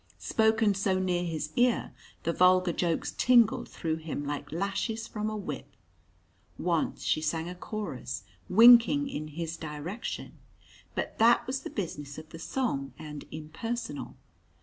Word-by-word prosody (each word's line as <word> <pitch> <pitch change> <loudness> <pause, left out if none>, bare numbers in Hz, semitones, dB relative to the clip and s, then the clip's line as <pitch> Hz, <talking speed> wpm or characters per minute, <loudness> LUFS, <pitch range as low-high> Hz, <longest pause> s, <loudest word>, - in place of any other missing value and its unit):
Spoken 220 -1 +3
so 190 -1 +1
near 180 -1 0
his 155 -3 -3
ear, 245 -1 +2 0.3
the 170 - 0
vulgar 180 0 +4
jokes 170 -2 -1
tingled 240 -3 +4
through 160 -1 -2
him 155 -2 -5
like 145 0 -4
lashes 200 +6 -2
from 215 0 -3
a 215 - -3
whip. 150 - -6 0.8
Once 170 -2 0
she 155 - +1
sang 160 +1 -1
a 180 - -5
chorus, 180 - -5 0.3
winking 240 +7 +7
in 155 - -4
his 165 +2 -4
direction. 160 +8 -6 0.6
But - - -3
that 230 +2 +5
was 265 +1 -2
the - - -6
business 145 -8 -5
of 155 0 -9
the 165 - -10
song, 165 - -2
and 150 -2 -8
impersonal. 165 +11 -5
180 Hz, 145 wpm, -29 LUFS, 155-220 Hz, 0.8 s, winking